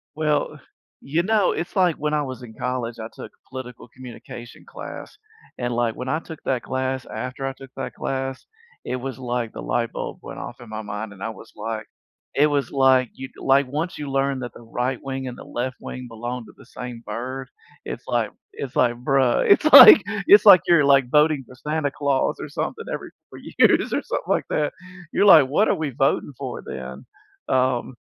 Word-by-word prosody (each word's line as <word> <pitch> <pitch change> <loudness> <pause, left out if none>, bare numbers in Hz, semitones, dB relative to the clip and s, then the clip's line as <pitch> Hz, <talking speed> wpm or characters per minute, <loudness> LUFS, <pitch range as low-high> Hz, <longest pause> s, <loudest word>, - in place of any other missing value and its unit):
Well, 150 -1 0
uh, - - -12 0.4
you 155 +5 0
know, 210 -1 +2
it's 175 - -5
like 180 -4 +3
when 150 +1 -2
I 150 - +2
was 130 -2 -7
in 110 -2 -10
college, 125 -2 -3
I 110 - -5
took - - -10 0.2
political 125 -2 -8
communication 120 -1 -11
class. - - -9 0.4
And, 120 -1 -2
like, 120 -1 0
when 125 +1 -5
I 155 - 0
took 160 -2 -10
that 130 -3 -1
class, 130 0 -2
after 130 +1 -5
I 135 - -2
took 135 0 -13
that 135 - -5
class, 135 -1 -4 0.4
it 130 - -2
was 130 -1 -6
like 120 -3 -3
the - - -7
light 115 -1 -1
bulb - - -5
went - - -9
off - - -8
in 120 - -12
my 110 0 -5
mind. 105 0 -6
And 100 0 -11
I - - -2
was 110 - -11
like 110 +1 -5 0.5
it 145 - +5
was 145 -2 0
like 130 -2 +4
y 135 - -5
like 140 +1 +3
once 155 +6 -3
you 150 - -5
learn 135 0 0
that 120 -1 -6
the - - -13
right 125 +2 -3
wing 135 -1 -5
and 125 - -6
the - - -10
left 125 +1 -4
wing 125 0 -7
belong 120 +1 -6
to 105 - -15
the - - -16
same 125 -2 -8
bird, 130 +2 -5 0.4
it's - - -6
like - - 0 0.2
it's 135 -3 -7
like, 120 -1 +3
"Bruh." 130 0 +2
It's 200 - +5
like - - +12 0.3
it's 410 +2 +8
like, 180 - +10
you're 170 -4 +5
like 135 -3 +4
voting 150 -1 +3
for 130 - -14
Santa 150 +2 -2
Claus 140 -1 0
or - - -5
something - - -4
every - - -6 0.2
4 - - -11 0.2
years - - +4
or - - 0
something - - -3
like - - +1
that. 150 -1 0 0.4
You're - - +2
like, 155 -9 +8
"What 200 +11 +2
are - - +3
we 155 -2 -2
voting 135 +2 0
for, 135 -3 -6
then?" 65 +1 -7 0.5
Um, 130 -1 +1
130 Hz, 205 wpm, -23 LUFS, 120-140 Hz, 0.5 s, like